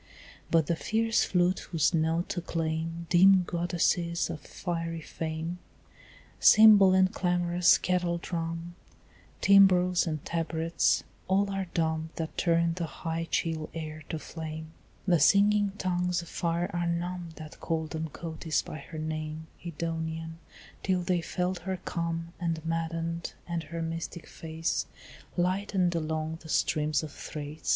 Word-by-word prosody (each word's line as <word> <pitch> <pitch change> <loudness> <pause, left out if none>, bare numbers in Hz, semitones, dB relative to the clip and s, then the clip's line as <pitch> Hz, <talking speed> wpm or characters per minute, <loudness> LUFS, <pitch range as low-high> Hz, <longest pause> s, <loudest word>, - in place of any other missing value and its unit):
But 165 -2 +4
the 170 - 0
fierce 225 +5 +1
flute 180 0 +2
whose 165 0 +2
notes 165 +2 0
acclaim 165 -1 -2
Dim 185 +1 +7
goddesses 170 0 0
of 155 - -6
fiery 165 +1 -4
fame, 160 +2 -4 0.8
Cymbal 210 -3 +8
and 190 0 +4
clamorous 175 -1 +3
kettledrum, 170 -1 -2 0.7
Timbrels 185 -3 +5
and 155 -3 -3
tabrets, 165 0 +1 0.2
all 195 +1 +2
are 195 -1 -2
dumb 160 -1 0
That 160 -1 -4
turned 170 0 +2
the 170 -2 -2
high 165 +1 -4
chill 160 -2 -1
air 155 -1 -5
to 160 - -2
flame; 160 0 -7 0.3
The 175 -3 +4
singing 205 +1 +4
tongues 180 -1 0
of 170 - -12
fire 170 +1 -1
are 175 -1 0
numb 175 0 -2
That 155 -1 -10
called 160 -2 -2
on 160 0 -2
Cotys 160 0 -2
by 155 - -7
her 155 +3 -9
name 155 0 -4 0.2
Edonian, 165 -1 -4 0.4
till 185 -2 +1
they 180 -1 +1
felt 180 +2 -2
her 190 -1 -3
come 170 0 -3
And 165 -2 -2
maddened, 165 0 -2
and 170 -1 -2
her 165 +1 -4
mystic 165 +1 -5
face 160 +1 -3 0.5
Lightened 185 0 +1
along 160 0 -2
the 160 - -12
streams 150 -1 +1
of 155 - -6
Thrace. 150 +1 -7
170 Hz, 135 wpm, -29 LUFS, 160-180 Hz, 0.8 s, Cymbal